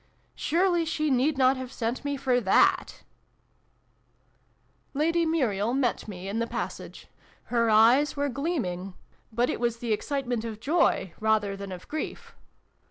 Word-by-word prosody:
" - - -40
Surely 345 +1 +1
she 310 -2 -1
need 265 +3 +2
not 260 0 +4
have 260 -1 -6
sent 235 0 -2
for - - -6
me 285 0 -1
for 255 -2 +1
that! 195 -3 +2 1.3
" - - -41
Lady 330 +3 +2
Muriel 240 -8 0
met 260 -5 0
me 190 -2 -7
in 205 +3 -2
the 230 - -1
passage. - - -6 0.5
Her 230 -1 +3
eyes 235 +7 +5
were 285 0 +1
gleaming 235 - -3 0.4
but 240 +2 +1
it - - -2
was 235 -1 0
the 230 -2 -1
excite 275 +5 -2
ment 240 -2 -2
of 220 -2 -6
joy, 290 - +1
rather 215 -2 +1
than 195 -1 -7
of 180 -1 -9
grief. 310 - -5
245 Hz, 165 wpm, -27 LUFS, 220-285 Hz, 1.3 s, eyes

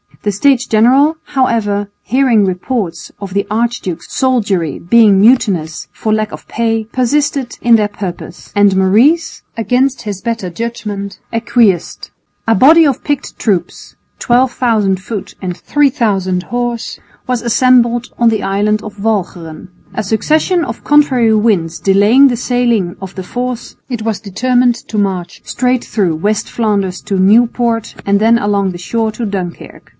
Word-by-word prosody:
The 205 - 0
States 255 +5 +2
General, 265 +8 +3
however, 210 -6 0
hearing 250 -5 +2
reports 185 -2 -3
of 195 -2 -7
the 200 0 0
archduke's 215 -6 -3
soldiery 205 - 0
being 210 +1 +4
mutinous 195 -9 +2
for 215 - -2
lack 215 -1 -1
of - - -10
pay, 225 -1 -1
persisted 255 +2 -1
in 235 -1 +4
their 210 -2 +2
purpose, 190 -4 -8
and 205 -1 +4
Maurice, 240 - +2 0.2
against 255 +4 0
his 205 -3 -5
better 225 -5 -3
judgment, 210 -1 -5
acquiesced. 225 -6 0 0.4
A 225 - +4
body 315 - +6
of 275 -4 0
picked 290 -2 -3
troops, 195 -6 -2 0.2
12,000 240 -5 +1
foot 200 +2 -7
and 180 -2 -4
3000 210 -11 0
horse, 240 +1 -4 0.3
was 250 -2 -1
assembled 240 0 +2
on 235 -1 +4
the 220 -2 -1
island 210 +2 0
of 210 -1 -9
Walcheren. 180 -7 -3 0.3
A 215 - -2
succession 310 - +1
of 230 - -7
contrary 265 -6 +3
winds 200 -7 +1
delaying 205 +8 +4
the 245 -3 -1
sailing 235 -7 0
of 190 0 -8
the 190 - -5
force, 245 +4 -5
it 240 -4 -4
was 220 -2 -2
determined 245 +4 +1
to 215 - -2
march 185 -3 -3
straight 250 0 0
through 190 -7 -1
West 205 +6 -1
Flanders 200 -5 -1
to 200 -2 -3
Nieuport 230 +3 +2
and 200 0 +2
then 225 +2 +4
along 200 -3 0
the 175 - -7
shore 220 +5 -2
to 230 +2 -4
Dunkirk. 190 -4 -6
220 Hz, 145 wpm, -14 LUFS, 195-245 Hz, 0.4 s, body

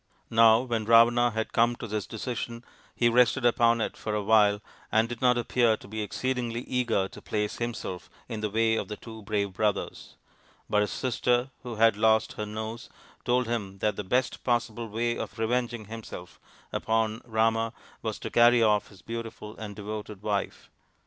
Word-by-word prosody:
Now 115 0 +6
when 115 -4 -2
Ravana 120 +2 +6
had 110 0 -3
come 120 +1 +3
to 120 - -7
this 105 -2 -3
decision, 115 +1 -5 0.3
he 120 - +3
rested 120 +1 +3
upon 115 -1 +4
it - - -2
for 105 -1 -3
a 105 - -1
while 105 -1 +4 0.3
and 110 +2 +3
did 120 -1 -7
not 125 -1 +4
appear 120 -1 +2
to - - -14
be 110 +2 -4
exceedingly 120 +1 -2
eager 120 -7 0
to - - -12
place 105 -1 -2
himself 115 -6 -5 0.2
in 110 -3 -5
the 105 - -1
way 110 +1 +2
of - - -3
the 105 - -6
two 110 -1 -10
brave 100 -2 -2
brothers; 105 +1 -2 0.5
but 105 - +2
his 105 - 0
sister, 125 0 0
who 120 -2 -6
had 110 -1 +4
lost 110 0 +3
her 105 - -5
nose, 110 +2 -6 0.4
told 125 0 +2
him 105 -5 -3
that 105 +2 0
the 105 - -4
best 125 +7 0
possible 120 -2 -1
way 120 +2 -1
of - - -6
revenging 120 0 -1
himself 110 -5 -9 0.3
upon 110 0 0
Rama 115 0 +1 0.3
was 110 -2 -3
to - - -5
carry 120 0 +6
off 105 -2 +3
his 95 -3 -17
beautiful 115 -2 -7
and 105 -2 -7
devoted 105 -1 -7
wife. 105 -2 -3
115 Hz, 180 wpm, -28 LUFS, 105-120 Hz, 0.5 s, Now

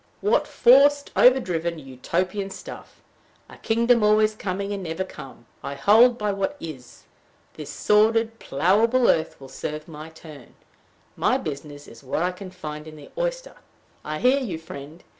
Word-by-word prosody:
"What 440 +4 +2
forced, 285 +3 +4
overdriven, 175 -10 +3
Utopian 170 +9 -3
stuff! - - -11 0.4
A - - -14
kingdom 235 +1 +2
always 215 0 +3
coming, 200 -1 -4
and 200 - -4
never 165 +1 -3
come! 135 -9 -12 0.2
I 140 - -6
hold 225 - +5
by 210 -2 -1
what 200 +9 -3
is. 135 -7 -10 0.5
This - - -9
solid, 225 +2 +2
plowable 220 - +2
earth 160 0 -3
will 135 - -11
serve 150 +3 -6
my 155 -1 -9
turn. 155 -5 -14 0.6
My - - +1
business 145 0 -7
is - - -14
what 135 +5 -2
I 180 - 0
can 185 +1 -10
find 155 -4 -8
in 155 - -10
the 150 - -14
oyster." - - -4 0.5
I 155 0 -4
hear 255 - +3
you, 210 -12 -4
friend. 160 0 -11
185 Hz, 155 wpm, -24 LUFS, 155-225 Hz, 0.6 s, hold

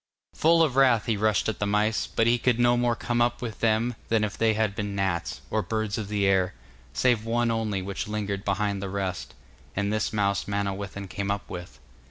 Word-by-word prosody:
Full 165 +1 +4
of 145 -5 0
wrath 125 -5 +5
he 115 - +1
rushed 105 -1 +1
at 110 - -2
the 100 - 0
mice, 105 +1 +1
but 115 - +1
he 120 +1 +3
could 120 -1 +2
no 120 0 +4
more 120 -1 +1
come 120 0 -1
up 120 0 +1
with 115 -3 -6
them 115 +2 +2
than 115 -1 +2
if 105 -2 -2
they 110 -1 +2
had 110 -2 0
been 105 -2 -3
gnats, 90 -4 -1
or 110 - +1
birds 110 -1 -2
of 105 - -4
the 105 -1 0
air, 95 -1 +2 0.4
save 120 - +2
one 115 +1 +1
only 110 -4 -1
which 100 +1 -4
lingered 100 -2 -3
behind 100 0 -1
the 100 - -4
rest, 95 -2 -4 0.4
and 100 +1 0
this 110 0 0
mouse 100 -2 0
Manawyddan 100 -1 -3
came 100 +1 -4
up 100 0 -2
with. 90 0 -7
105 Hz, 215 wpm, -26 LUFS, 100-115 Hz, 0.4 s, wrath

